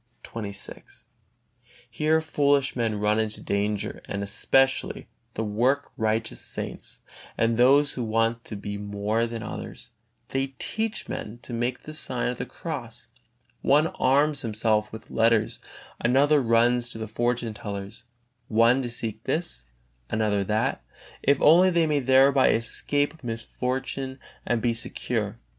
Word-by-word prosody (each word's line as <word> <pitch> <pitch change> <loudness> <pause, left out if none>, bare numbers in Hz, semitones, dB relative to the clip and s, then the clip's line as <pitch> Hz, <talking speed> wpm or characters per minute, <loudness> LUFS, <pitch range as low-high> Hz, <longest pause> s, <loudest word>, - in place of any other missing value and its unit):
XXVI. 100 -3 -8 0.8
Here 155 +7 +1
foolish 145 -3 +1
men 115 -4 -1
run 105 +1 +2
into 110 -1 -2
danger, 100 0 -2
and 100 0 -4
especially 135 +6 +1 0.3
the 110 - -1
work 120 +7 +1
righteous 110 +1 -1
saints, - - -4 0.4
and 115 0 +2
those 140 +5 +5
who 125 - -3
want 115 +1 0
to 105 - -6
be 100 0 -5
more 105 +3 -1
than 115 -1 -5
others; - - -7 0.4
they 135 0 -2
teach 220 - -2
men 110 +3 -5
to 120 - -8
make 120 +2 -2
the 155 - -8
sign 130 -5 0
of 125 - -4
the - - -3
cross; 125 -5 -7 0.5
one 150 +3 +4
arms 145 +2 +2
himself 110 -2 0
with 110 0 -10
letters, 115 -1 +2 0.4
another 140 +5 +4
runs 120 0 +3
to 115 - -6
the 110 0 -5
fortunetellers; 110 -3 -3 0.5
one 115 +4 +4
seeks 115 -3 -3
this, 165 - -2 0.4
another 105 -2 +1
that, 105 - -1 0.4
if 140 0 +3
only 175 +5 +7
they 170 -2 +3
may 150 -2 +1
thereby 135 +1 +5
escape 145 +6 0
misfortune 130 +3 -3 0.3
and 120 -2 0
be 120 -1 +2
secure. 115 - -3
120 Hz, 135 wpm, -26 LUFS, 110-135 Hz, 0.8 s, only